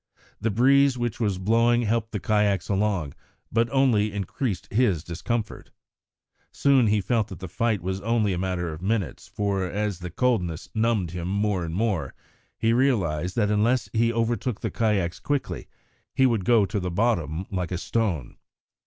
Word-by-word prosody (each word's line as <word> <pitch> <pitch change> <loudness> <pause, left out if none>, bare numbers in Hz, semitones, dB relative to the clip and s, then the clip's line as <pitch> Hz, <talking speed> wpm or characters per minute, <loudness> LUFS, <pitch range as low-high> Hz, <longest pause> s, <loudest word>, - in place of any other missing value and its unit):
The 115 - 0
breeze 135 +4 +4
which 120 -2 -2
was 105 -5 0
blowing 115 +5 +3
helped 115 0 0
the 105 - -3
kayaks 105 -3 +1
along, 95 -7 0 0.4
but 115 +1 +2
only 120 -6 +2
increased 100 - -3
his 105 -9 +2
discomfort. 105 +7 -4 0.8
Soon 135 -4 +3
he 105 0 +3
felt 110 +1 0
that - - -8
the 95 - -7
fight 105 +2 -1
was 95 +1 -3
only 110 -2 +1
a 90 - -2
matter 90 -3 -2
of 75 - -9
minutes 95 - -2
for 100 -2 -1
as 100 +1 -2
the 90 0 -6
coldness 90 -6 -1
numbed 110 -6 +1
him 85 0 -4
more 100 -1 0
and 80 0 -4
more, 95 - -1 0.4
he 115 +1 +2
realised 95 - +1
that 105 -3 +1
unless 115 +4 +1
he 115 +1 +2
overtook 115 0 -1
the - - -2
kayaks 100 -6 0
quickly 145 -2 -3 0.5
he 135 - +4
would 115 -7 +1
go 115 -3 +5
to 100 +2 -2
the 90 -1 -3
bottom 85 -4 0
like 90 -2 -2
a 90 - -1
stone. 90 - -2
105 Hz, 170 wpm, -25 LUFS, 90-115 Hz, 0.8 s, go